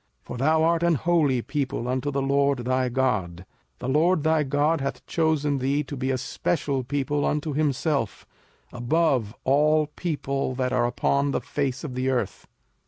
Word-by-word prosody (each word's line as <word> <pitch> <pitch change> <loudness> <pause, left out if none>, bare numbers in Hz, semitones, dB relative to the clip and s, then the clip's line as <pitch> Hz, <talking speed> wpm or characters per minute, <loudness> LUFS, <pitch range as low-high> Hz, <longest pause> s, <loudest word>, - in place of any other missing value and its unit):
05:007:006 - - -42
For 125 - -6
thou 155 +5 +3
art 165 0 +2
an 170 -1 +3
holy 150 -5 +2
people 135 -5 -3
unto 130 +2 -1
the 140 -1 -1
LORD 140 -2 +1
thy 130 0 +1
God: 105 -9 -1 0.3
the - - -6
LORD 155 +4 +2
thy 160 0 +3
God 145 +2 +1
hath 135 - -4
chosen 150 -4 +1
thee 140 +3 0
to 140 +1 -7
be 130 0 -2
a 130 - +1
special 140 0 -2
people 145 +2 -1
unto 150 0 -1
himself, 145 -4 -1 0.5
above 125 -3 +1
all 150 +3 +3
people 140 -6 -2
that 125 0 -1
are 120 -1 +2
upon 140 +3 +1
the - - 0
face 140 -3 -3
of 145 -5 -5
the 130 +1 -1
earth. 130 -2 -2
140 Hz, 170 wpm, -25 LUFS, 130-150 Hz, 0.5 s, thou